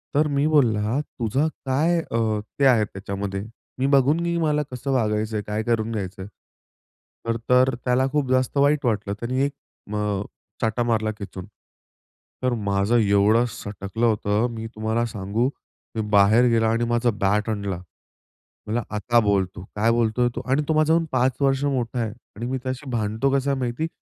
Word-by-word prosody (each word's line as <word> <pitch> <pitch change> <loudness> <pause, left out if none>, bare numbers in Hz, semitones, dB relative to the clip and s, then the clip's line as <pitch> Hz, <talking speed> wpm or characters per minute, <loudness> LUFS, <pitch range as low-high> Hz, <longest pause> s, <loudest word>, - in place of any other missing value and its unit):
तर 150 +1 +4
मी 140 0 +1
बोलला, 120 -5 +2
"तुझा 135 +1 -1 0.2
काय 160 +6 +2
अ, 110 -7 -1 0.2
ते 140 - +4
आहे 120 -5 +5
त्याच्यामध्ये? 100 0 -5 0.4
मी 130 - +1
बघून 140 +3 +4
नी 170 0 0
मला 150 -2 +1
कसं 125 +2 -3
वागायचंय? 110 -3 0
काय 105 +1 -3
करून 115 -1 0
घ्यायचंय?" 95 -3 -4 1.0
तर 115 0 +1
तर, 130 +1 +5
त्याला 125 +1 +2
खूप 145 -3 0
जास्त 130 +2 +1
वाईट 140 0 +3
वाटलं, 105 -3 0
त्यांनी 125 +3 -1
1 140 - -3 0.4
मग 105 -2 -1 0.4
चाटा 110 +2 +1
मारला 110 -2 +1
खेचून. 95 -2 -7 1.0
तर 125 - +2
माझं 100 +4 +2
एवढं 105 +2 +4
सटकलं 100 +3 -4
होतं 105 +1 +1
मी 115 0 -5
तुम्हाला 110 +2 0
सांगू, 105 +4 -1 0.5
मी 110 - 0
बाहेर 105 +4 +5
गेला 115 -1 +3
आणि 115 +1 +1
माझा 120 +1 +2
बॅट 105 +3 +2
आणला. 100 -4 -2 0.9
म्हणला, 115 +2 -1
"आता 120 +3 +2
बोल 100 -3 +2
तू. 90 - -8
काय 110 +2 +3
बोलतोय 120 +1 +2
तू?" 120 - -3
आणि 145 +3 +3
तो 160 - +2
माझाहून 160 +2 +3
पाच 130 0 +1
वर्ष 135 0 +2
मोठा 125 -3 -1
आहे 115 -2 -1 0.3
आणि 115 +4 -5
मी 130 +2 -1
त्याशी 130 +2 -4
भांडतो 110 +3 0
कसं 140 +1 -1
आहे 135 - -1
माहिती? 125 +6 -2
115 Hz, 165 wpm, -23 LUFS, 105-130 Hz, 1.0 s, आहे